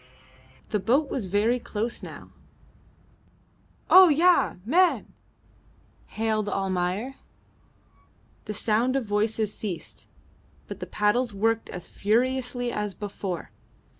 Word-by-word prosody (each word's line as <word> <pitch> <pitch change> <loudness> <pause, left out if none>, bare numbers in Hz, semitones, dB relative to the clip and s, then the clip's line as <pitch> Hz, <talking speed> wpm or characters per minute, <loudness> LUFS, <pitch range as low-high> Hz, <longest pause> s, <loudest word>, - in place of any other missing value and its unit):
The 210 - 0
boat 265 +8 +1
was 220 -8 -2
very 215 +6 +2
close 225 +1 -4
now. - - -10 1.6
"Oh, 370 -1 +9
ya! 340 +4 +4
Man!" 350 +9 +2 0.9
hailed 215 -1 -1
Almayer. 190 +6 -2 1.3
The 210 - -5
sound 230 +5 +1
of 270 -3 0
voices 210 0 0
ceased, 195 -6 -6 0.6
but - - -8
the - - -6
paddles 210 +2 +1
worked 225 +2 0
as 180 -1 -7
furiously 245 +3 0
as 210 -3 -3
before. 195 -4 -5
220 Hz, 105 wpm, -26 LUFS, 205-250 Hz, 1.6 s, Oh